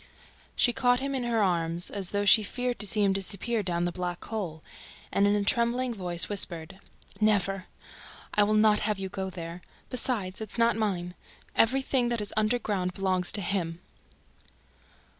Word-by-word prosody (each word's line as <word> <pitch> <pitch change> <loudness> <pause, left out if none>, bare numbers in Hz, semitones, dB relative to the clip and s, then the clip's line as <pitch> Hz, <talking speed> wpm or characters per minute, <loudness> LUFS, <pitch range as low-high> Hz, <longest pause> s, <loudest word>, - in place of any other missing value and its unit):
She 240 - +3
caught 245 -1 +2
him 275 +1 -3
in 255 -2 -2
her 230 -3 +1
arms, 170 -2 0
as 195 -3 -3
though 205 0 -1
she 215 +2 +7
feared 245 +4 -3
to 210 - +2
see 210 +1 +2
him 195 -1 +3
disappear 200 +4 -1
down 175 -3 -1
the 175 - -1
black 180 0 -4
hole, 175 -8 -5 0.5
and, 200 - +3
in 205 - +3
a 205 - +1
trembling 235 +3 +1
voice, 175 -5 0
whispered: 185 -2 -1 0.4
"Never!... 195 -3 +1 0.7
I 210 - +3
will 210 +1 +3
not 215 -1 +4
have 210 -1 0
you 190 -1 -4
go 190 0 -4
there!... 170 -1 -7 0.3
Besides, 220 -7 0
it's 215 +1 -6
not 230 0 +3
mine... 185 -5 -2 0.4
EVERYTHING 260 +1 +2
THAT 235 -1 -1
IS 205 - -3
UNDERGROUND 210 -4 0
BELONGS 185 -2 0
TO 205 - +2
HIM!" 175 -3 -2
205 Hz, 170 wpm, -28 LUFS, 180-225 Hz, 0.7 s, she